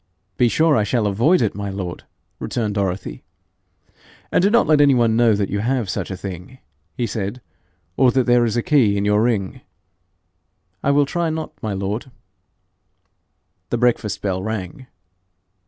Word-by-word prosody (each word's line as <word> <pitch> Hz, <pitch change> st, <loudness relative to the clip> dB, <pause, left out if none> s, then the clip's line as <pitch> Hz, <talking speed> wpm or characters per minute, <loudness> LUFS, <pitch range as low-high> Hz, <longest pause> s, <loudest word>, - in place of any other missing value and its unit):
'Be 120 Hz, -, +3 dB
sure 160 Hz, +4 st, +3 dB
I 110 Hz, -, +2 dB
shall 110 Hz, +1 st, 0 dB
avoid 120 Hz, -, +3 dB
it, 110 Hz, -, 0 dB
my 100 Hz, 0 st, -5 dB
lord,' 95 Hz, -3 st, -6 dB, 0.3 s
returned 110 Hz, -4 st, -2 dB
Dorothy. 95 Hz, -, -3 dB, 1.1 s
'And -, -, +3 dB
do 195 Hz, -, +4 dB
not 235 Hz, +2 st, +4 dB
let 150 Hz, -2 st, +4 dB
any 140 Hz, -2 st, +5 dB
one 115 Hz, -2 st, +2 dB
know 120 Hz, 0 st, +4 dB
you 100 Hz, 0 st, -1 dB
have 120 Hz, -3 st, -1 dB
such -, -, -4 dB
a 95 Hz, -, -5 dB
thing,' 95 Hz, +6 st, -8 dB, 0.4 s
he 120 Hz, -, 0 dB
said, 105 Hz, +2 st, -4 dB, 0.6 s
'or 130 Hz, -2 st, +5 dB
that 130 Hz, 0 st, +2 dB
there 120 Hz, 0 st, +3 dB
is 115 Hz, 0 st, 0 dB
a 120 Hz, -, 0 dB
key 115 Hz, -9 st, +3 dB
in 100 Hz, -, -1 dB
your 105 Hz, +1 st, +3 dB
ring.' 110 Hz, -5 st, -1 dB, 1.2 s
'I -, -, +1 dB
will 145 Hz, 0 st, +4 dB
try 170 Hz, +3 st, -1 dB
not, 160 Hz, 0 st, -4 dB
my 110 Hz, -4 st, -3 dB
lord.' 100 Hz, +6 st, -4 dB, 1.6 s
The 120 Hz, -, 0 dB
breakfast 115 Hz, -4 st, 0 dB
bell 95 Hz, -2 st, -1 dB
rang. 110 Hz, +4 st, -5 dB
110 Hz, 165 wpm, -20 LUFS, 100-130 Hz, 1.6 s, any